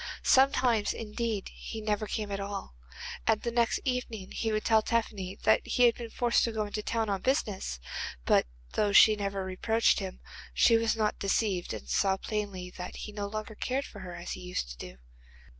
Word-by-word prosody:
Sometimes, 255 -5 +4
indeed, 220 -2 -3
he 225 - -7
never 215 0 -1
came 210 0 -3
at 200 - -2
all, 200 - -5 0.5
and 225 -1 +4
the 235 - -1
next 235 -1 +2
evening 245 -6 -3
he 225 - -1
would 215 0 -1
tell 220 -1 +5
Tephany 210 -5 -1
that - - +5
he 250 - +1
had 240 -1 +7
been 235 -1 -7
forced 240 +1 +2
to 230 - +1
go 220 -1 -1
into 205 +1 -4
the - - -20
town 225 0 0
on 195 -2 -1
business, 205 - -1 0.5
but - - +4 0.3
though 205 -1 +1
she 215 +1 +8
never 200 -2 -3
reproached 220 +6 +2
him 190 -2 -6 0.4
she 230 - +6
was 225 -1 +2
not 215 -1 0
deceived 195 -2 0
and - - -6
saw 195 -1 +2
plainly 200 -4 -4
that 180 0 -7
he 210 - -7
no 205 -1 -4
longer 215 +1 -5
cared 260 +5 -2
for 205 - -11
her 180 -2 -7
as 175 0 -6
he - - -4
used 180 - -3
to - - -9
do. - - -9
210 Hz, 200 wpm, -30 LUFS, 195-230 Hz, 0.5 s, she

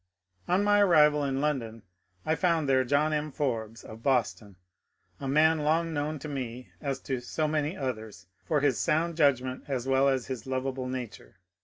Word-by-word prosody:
On 185 +3 +2
my 205 0 +4
arrival 150 -6 +5
in 135 -1 -1
London 115 -7 -2 0.4
I 155 - +2
found 165 -3 +1
there 130 -1 +3
John 145 +4 +1
M. 150 0 -2
Forbes 115 -6 -3
of 110 +1 -11
Boston, 115 -6 0 0.6
a 135 - -5
man 155 +3 +4
long 160 +2 +1
known 150 +1 -2
to 150 - -8
me 130 -3 -6
as 140 -2 -2
to 130 -2 -3
so 155 +5 -2
many 150 +2 -1
others 110 -7 -5 0.2
for 150 -3 0
his 140 -4 +2
sound 165 +2 +1
judgment 130 -4 +1
as 130 -3 -2
well 135 +1 +3
as 130 -3 0
his 130 -2 -6
lovable 130 0 -2
nature. 125 -7 -7
140 Hz, 175 wpm, -28 LUFS, 130-155 Hz, 0.6 s, arrival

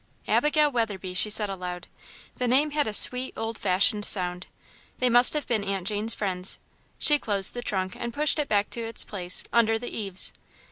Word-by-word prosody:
"Abigail 300 0 +2
Weatherby," 205 -7 -3
she 190 +3 0
said 210 0 +2
aloud. 180 -2 -7 0.5
The 250 - -2
name 280 +5 +2
had 295 -3 -1
a - - -2
sweet, 250 +4 +5
old 225 0 -5
fashioned 200 +3 +1
sound. 180 -2 -1 0.5
"They 250 -1 0
must 245 +1 +6
have 300 - -2
been 220 -4 -2
Aunt 195 -2 -4
Jane's 215 +2 0
friends." 185 -2 -2 0.4
She 295 -1 +4
closed 200 -6 +3
the 245 - -6
trunk 190 -5 -3
and 240 0 -6
pushed 300 +4 0
it 295 - -1
back 205 -1 0
to 235 - -5
its 225 0 0
place, 180 -3 -1
under 225 -1 +2
the 245 +2 -8
eaves. 195 -3 -3
215 Hz, 190 wpm, -25 LUFS, 195-245 Hz, 0.5 s, must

